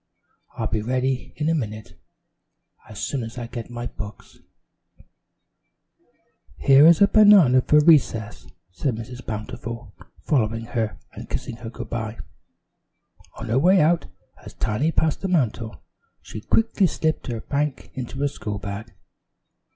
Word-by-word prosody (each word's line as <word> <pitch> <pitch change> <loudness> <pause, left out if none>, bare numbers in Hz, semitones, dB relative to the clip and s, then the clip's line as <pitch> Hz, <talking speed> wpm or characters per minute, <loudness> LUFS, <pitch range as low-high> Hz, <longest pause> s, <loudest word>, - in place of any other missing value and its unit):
"I'll - - -2
be 110 - -1
ready 130 +3 -1
in 150 - -2
a 165 - +2
minute, 110 -8 -4 0.9
as 105 - -10
soon 135 +3 -2
as 115 +1 -7
I 120 - -4
get 120 0 -7
my 120 0 -6
books." 105 -3 -9 2.2
"Here 140 +3 +6
is 170 +3 +6
a - - +7
banana 200 - +6
for 150 +4 +4
recess," 135 -9 +2 0.2
said 105 +8 -2
Mrs. 125 +3 -8
Bountiful, 110 0 -6 0.3
following 115 -6 0
her 115 -2 -2 0.2
and - - -10
kissing 115 - -4
her 115 -1 -7
good 120 +1 -9
by. 110 -1 -4 1.2
On 115 - -7
her 120 +4 +3
way 185 +6 +5
out 165 +2 +2 0.4
as - - -11
Tiny 135 +10 0
passed 160 -2 0
the 195 - -2
mantel, 125 - -1 0.4
she 110 - -9
quickly 220 - +2
slipped 160 0 -2
her 115 -3 -4
bank 145 0 -3
into 130 +1 -6
her 145 - +2
school 105 -7 -5
bag. 100 +3 -7
125 Hz, 145 wpm, -23 LUFS, 110-150 Hz, 2.2 s, a